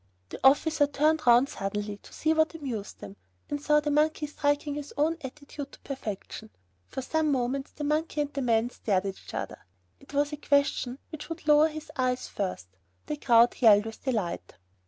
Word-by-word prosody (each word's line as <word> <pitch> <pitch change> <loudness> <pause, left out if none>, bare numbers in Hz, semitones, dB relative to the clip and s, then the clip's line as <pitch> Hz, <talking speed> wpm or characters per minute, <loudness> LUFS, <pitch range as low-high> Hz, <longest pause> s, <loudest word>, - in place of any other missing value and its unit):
The - - -7
officer 290 +2 +4
turned 305 +1 +1
round 240 +3 +7
suddenly 205 +1 -4
to - - -17
see 315 +1 +1
what 315 +1 +2
amused 245 -10 -6
them, 100 0 -9 0.3
and 290 0 -2
saw 300 0 +4
the 295 0 -2
monkey 305 +1 +2
striking 290 0 -1
his 290 0 -6
own 310 +3 +2
attitude 285 +1 -8
to - - -14
perfection. 220 -4 -6 0.4
For 265 - -5
some 315 +2 +1
moments 270 +1 -1
the 295 - -6
monkey 300 +1 0
and 290 0 -3
the 280 - -2
man 235 -1 +2
stared 200 -5 0
at 195 - -2
each - - -9
other. - - -4 0.4
It 275 - -16
was 290 +1 +1
a - - -3
question 280 -3 +1
which 310 +1 -8
would 330 -1 -7
lower 300 +1 +6
his 310 -1 -8
eyes 255 -1 0
first. 185 - -4 0.4
The 300 - -3
crowd 240 -3 +4
yelled 210 -3 +7
with 225 0 -8
delight. 215 -10 -2
280 Hz, 190 wpm, -28 LUFS, 235-300 Hz, 0.4 s, round